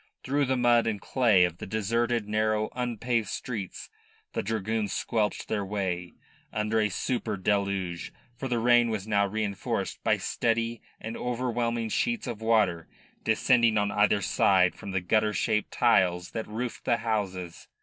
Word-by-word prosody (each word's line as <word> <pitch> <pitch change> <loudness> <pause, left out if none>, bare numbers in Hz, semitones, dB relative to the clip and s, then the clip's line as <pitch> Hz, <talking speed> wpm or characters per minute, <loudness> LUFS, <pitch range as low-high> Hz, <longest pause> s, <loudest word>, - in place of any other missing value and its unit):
Through 140 +2 +1
the 130 0 0
mud 120 -1 +4
and 105 -3 -1
clay 110 -5 +3
of 90 -1 -1
the - - -6
deserted, 115 +2 0
narrow, 110 0 +1
unpaved 120 -2 -1
streets 105 -2 -5 0.5
the - - -1
dragoons 110 -1 -2
squelched 110 -3 -1
their 105 -2 -1
way, 95 -3 -3 0.4
under 105 +1 0
a 105 -1 +2
super 110 +1 -2
deluge, 95 -3 -1 0.2
for 135 +3 -4
the 120 -2 0
rain 120 0 +4
was 110 -2 -3
now 100 -2 +2
reinforced 105 -1 -3
by - - +3
steady 115 0 -1 0.2
and 115 +1 -6
overwhelming 120 -2 -1
sheets 235 - 0
of 120 -4 -5
water 105 -7 +2 0.4
descending 115 0 +3
on 105 0 +1
either 105 0 +3
side 90 -2 +3
from - - -9
the 95 -1 -1
gutter 105 +4 +2
shaped 105 +2 0
tiles 90 -1 +2
that 110 - -4
roofed 115 +3 -5
the 120 -2 +3
houses. 95 -6 -3
110 Hz, 155 wpm, -28 LUFS, 100-115 Hz, 0.5 s, mud